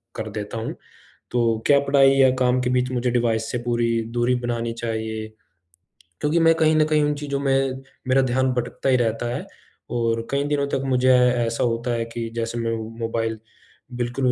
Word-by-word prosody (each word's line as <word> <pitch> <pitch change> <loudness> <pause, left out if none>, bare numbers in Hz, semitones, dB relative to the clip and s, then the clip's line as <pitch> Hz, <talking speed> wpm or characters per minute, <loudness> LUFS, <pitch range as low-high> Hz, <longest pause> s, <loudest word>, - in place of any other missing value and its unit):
कर 110 - -4
देता 105 +1 -5
हूँ। 110 - -4 0.6
तो 115 -2 +1
क्या 140 -1 +6
पढ़ाई 140 -1 +4
या 135 -1 +6
काम 125 0 +2
के 125 0 0
बीच 125 0 +1
मुझे 125 0 0
डिवाइस 115 -2 0
से 120 - -2
पूरी 120 -1 0 0.3
दूरी 120 +1 +1
बनानी 120 -1 -2
चाहिए? 110 -1 -4 0.9
क्योंकि 150 +3 +1
मैं 165 0 +5
कहीं 160 -1 +3
न 155 0 +4
कहीं 155 -1 +2
उन 145 0 +1
चीज़ों 145 -1 -3
में 135 -1 0 0.3
मेरा 130 +1 +4
ध्यान 130 0 +1
भटकता 125 +2 -2
ही 130 - +5
रहता 120 0 -1
है - - -5 0.4
और 115 -1 -1
कई 140 0 +1
दिनों 145 -1 0
तक 135 - -1
मुझे 130 -1 +2
ए 125 - +6 0.3
ऐसा 115 +1 -1
होता 120 +1 -1
है 115 -1 -1
कि 115 0 -5
जैसे 115 0 -3
मैं 115 0 -1 0.3
मोबाइल 115 -1 -2 0.6
बिल्कुल 125 +2 -1
125 Hz, 190 wpm, -23 LUFS, 115-135 Hz, 0.9 s, क्या